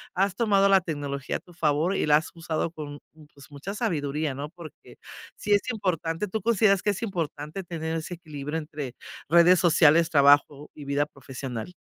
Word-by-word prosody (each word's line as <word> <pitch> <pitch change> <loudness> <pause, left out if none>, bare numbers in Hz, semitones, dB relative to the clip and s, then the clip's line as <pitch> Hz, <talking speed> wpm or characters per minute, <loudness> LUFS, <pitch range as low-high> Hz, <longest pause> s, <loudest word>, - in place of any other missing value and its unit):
has 195 +1 +1
tomado 200 -3 +3
la 195 -1 +5
tecnología 145 -4 -4
a - - -2
tu 175 - -19
favor, 160 +3 +1
y - - 0
la 150 - +6
has 155 - -4
usado 165 -1 -3
con, 145 -3 -8
mm, 155 -1 -17
pues, 140 +1 -16
mucha 145 +8 -7
sabiduría, 150 - -1
¿no?, 140 +3 -6
porque 170 -3 -13 0.4
sí 210 - -5
es 205 - +4
importante. 180 -4 -2
¿Tú 220 +3 -3
consideras 210 -2 +3
que 210 - 0
es 200 +2 -2
importante, 165 -3 -4
tener 160 -2 -4
ese 165 +2 -5
equilibrio, 150 -2 -6
entre 155 -1 -8 0.5
redes 170 +3 +6
sociales, 165 -1 +5
trabajo, 145 -1 +4
y 145 - -10
vida 140 +1 +1
profesional? 135 0 -7
160 Hz, 180 wpm, -26 LUFS, 145-185 Hz, 0.5 s, la